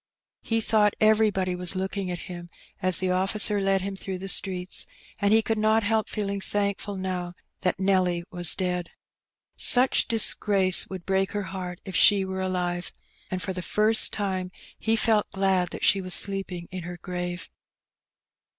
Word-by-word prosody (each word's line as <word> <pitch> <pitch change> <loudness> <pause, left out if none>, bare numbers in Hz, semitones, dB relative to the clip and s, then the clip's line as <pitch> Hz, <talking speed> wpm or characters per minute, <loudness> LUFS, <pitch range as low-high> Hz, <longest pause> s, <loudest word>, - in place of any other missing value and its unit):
He 225 -1 -1
thought 210 -2 +1
everybody 215 -4 +2
was 180 +1 +1
looking 190 0 -4
at 175 -1 -6
him, 175 -1 -9 0.3
as 185 -2 +5
the 185 -1 -1
officer 200 +2 +2
led 195 0 +1
him 195 +1 -5
through 190 -1 -6
the 190 +1 -8
streets, 185 -2 +1 0.3
and 200 0 +1
he 220 0 +4
could 220 0 -2
not 220 +1 +2
help 220 +1 0
feeling 200 -1 -3
thankfiil 200 0 -3
now 180 -2 -5 0.2
that 185 0 -1
Nelly 185 -3 +1
was 175 -2 +4
dead. 180 -2 -3 0.7
Such 250 +1 +4
disgrace 200 -5 +3
would 185 -2 -8
break 190 0 -1
her 205 -1 -3
heart 180 -2 -7
if 190 - -7
she 200 -2 +5
were 190 0 -5
alive. 180 -1 -3 0.4
And 185 0 -4
for 190 - -4
the 180 - -5
first 215 +5 +3
time 190 -3 -3 0.3
he 225 0 0
felt 220 -2 +2
glad 190 -2 0
that - - -4
she 195 - +4
was 185 -1 +5
sleeping 195 -3 -1
in 185 0 -6
her 175 +1 -8
grave. 180 0 -6
190 Hz, 170 wpm, -25 LUFS, 180-205 Hz, 0.7 s, as